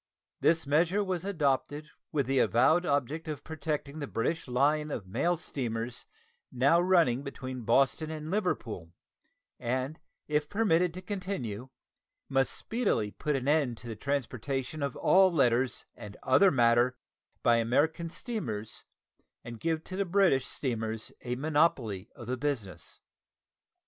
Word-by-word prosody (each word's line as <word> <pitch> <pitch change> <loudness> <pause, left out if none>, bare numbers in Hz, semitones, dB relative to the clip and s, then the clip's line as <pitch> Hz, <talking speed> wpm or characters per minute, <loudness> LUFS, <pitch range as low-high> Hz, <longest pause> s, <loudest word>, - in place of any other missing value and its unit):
This 165 -1 +3
measure 170 +8 +2
was 185 -3 -2
adopted 150 -4 -1 0.2
with 140 -3 +1
the 135 +1 +1
avowed 130 - +4
object 145 +3 -1
of 150 -3 -5
protecting 155 -1 -4
the 145 - -4
British 140 +9 -2
line 145 +5 +2
of 115 -9 -4
mail 170 - 0
steamers 120 -6 -4 0.4
now 140 +7 +4
running 170 -9 +3
between 130 -2 -6
Boston 135 +6 +2
and 155 0 -5
Liverpool, 115 - -2 0.7
and 130 +5 -2 0.3
if 150 0 0
permitted 180 -5 +2
to 185 - -7
Continue 180 - -4 0.6
must 135 -1 +2
speedily 215 - -1
put 150 +5 -2
an 135 0 -2
end 145 -6 +2
to 120 - -11
the 115 - -5
transportation 135 +2 -3
of 140 -3 -2
all 190 0 +5
letters 130 -5 +2
and 105 -1 -10
other 190 +9 +5
matter 120 -2 +3 0.5
by 120 0 +5
American 150 +9 +1
steamers 130 - -5 0.6
and 115 -1 -8
give 160 +2 -1
to 190 +1 -2
British 185 -8 +3
steamers 110 -4 -3
a 125 0 -3
monopoly 130 - +1
of 120 - -9
the 130 +2 -2
business. 120 - -4
140 Hz, 135 wpm, -30 LUFS, 120-165 Hz, 0.7 s, all